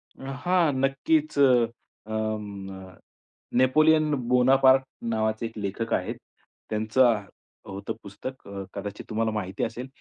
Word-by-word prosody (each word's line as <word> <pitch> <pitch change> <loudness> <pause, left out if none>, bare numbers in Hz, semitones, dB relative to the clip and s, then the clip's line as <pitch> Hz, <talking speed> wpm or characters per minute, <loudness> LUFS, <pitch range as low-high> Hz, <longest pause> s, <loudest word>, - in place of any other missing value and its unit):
अ, 135 0 -7
हां 175 -4 +3
नक्कीच 310 - +1
अ, 120 -4 +1
म 105 -3 -3
न 95 -1 -11 0.6
नेपोलियन 155 +3 +4 0.2
बोनापार्ट 130 +1 +5 0.3
नावाचे 110 +1 0
एक 115 0 -7
लेखक 105 +3 -3
आहेत. - - -1 0.5
त्यांचं 110 +1 +3 0.5
होतं 100 +3 -5
पुस्तक 105 +6 -8
अ, 100 -1 -6
कदाचित 100 0 -6
तुम्हाला 110 0 0
माहिती 95 -2 -3
असेल. 120 +3 -4
115 Hz, 120 wpm, -26 LUFS, 105-135 Hz, 0.6 s, बोनापार्ट